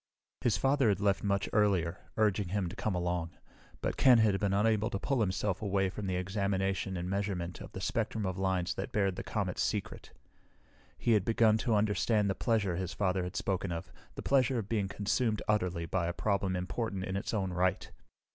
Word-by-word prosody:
His 120 - +2
father 135 -3 +3
had 100 -2 +1
left 100 -2 +1
much 100 -1 +1
earlier, 95 -5 +2 0.2
urging 105 -3 +2
him 95 0 -1
to 95 - -8
come 110 -3 -1
along, 90 -1 -2 0.4
but - - -2
Ken 130 -3 +7
had 105 -3 +3
been 100 -2 +1
unable 110 +2 +2
to 100 - -2
pull 130 +4 0
himself 95 -1 0
away 95 -2 +1
from 100 +1 -5
the 95 - -1
examination 95 0 -1
and 90 +1 -3
measurement 95 -3 -2
of - - -9
the 95 - -6
spectrum 110 -1 -1
of 95 -1 -2
lines 95 -2 0
that 95 - -5
bared 100 -3 +1
the - - -4
comet's 95 -4 -2
secret. 105 -2 -3 0.9
He 120 - +1
had 105 -4 +4
begun 110 0 +3
to 115 0 +1
understand 105 0 +2
the - - +1
pleasure 100 -4 0
his 90 -1 -3
father 95 -1 +1
had 90 - -6
spoken 95 -1 -1
of, 85 -1 -5 0.2
the - - -6
pleasure 130 -2 +3
of 110 -4 -3
being 105 -3 0
consumed 105 +3 0
utterly 90 -5 0
by 85 0 -1
a 85 - -2
problem 100 -1 0
important 95 +2 -3
in 95 0 -3
its 100 - -2
own 95 -5 -1
right. 90 +1 0
100 Hz, 200 wpm, -31 LUFS, 95-105 Hz, 0.9 s, Ken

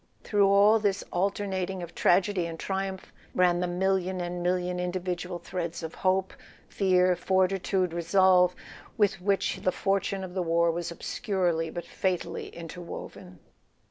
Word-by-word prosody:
Through 205 -2 +3
all 200 +3 +5
this 200 -2 0
alternating 190 -1 -1
of 170 - -9
tragedy 185 -1 +2
and 165 -1 -7
triumph 190 -1 -4 0.2
ran 180 -1 +3
the 180 - 0
million 185 +1 0
and 175 0 -3
million 180 0 0
individual 180 0 -3
threads 170 -1 -5
of 160 - -5
hope, 190 0 0 0.3
fear, 185 -2 +3
fortitude, 185 0 +1
resolve, 180 +1 +4 0.4
with 205 -3 +2
which 195 +1 +1
the 185 - +2
fortune 195 0 -1
of 180 -1 -7
the 185 - -1
war 170 0 +2
was 170 0 -3
obscurely 170 -2 -1
but 175 +1 -6
fatally 185 -2 -2
inter¬ 170 +1 -9
woven. 90 - -9
185 Hz, 140 wpm, -28 LUFS, 175-190 Hz, 0.4 s, all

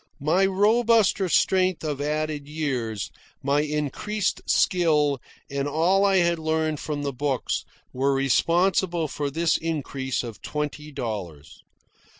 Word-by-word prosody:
My 175 +7 +3
robuster 210 0 +3
strength 185 +3 +2
of 145 -3 -3
added 150 -1 -2
years, 125 - -3 0.3
my 140 +2 +2
increased 150 +8 -2
skill, 150 -7 +2 0.3
and 140 0 -2
all 170 +7 +2
I 195 -1 +4
had 170 -2 +2
learned 160 -1 0
from 145 -2 -4
the 140 -1 -2
books, 135 0 -1 0.3
were 135 +2 +1
responsible 170 +5 +2
for 145 0 -3
this 165 +3 +1
increase 140 -6 -3
of 115 -3 -8
twenty 150 0 -4
dollars. 100 - -6
150 Hz, 125 wpm, -25 LUFS, 140-175 Hz, 0.3 s, I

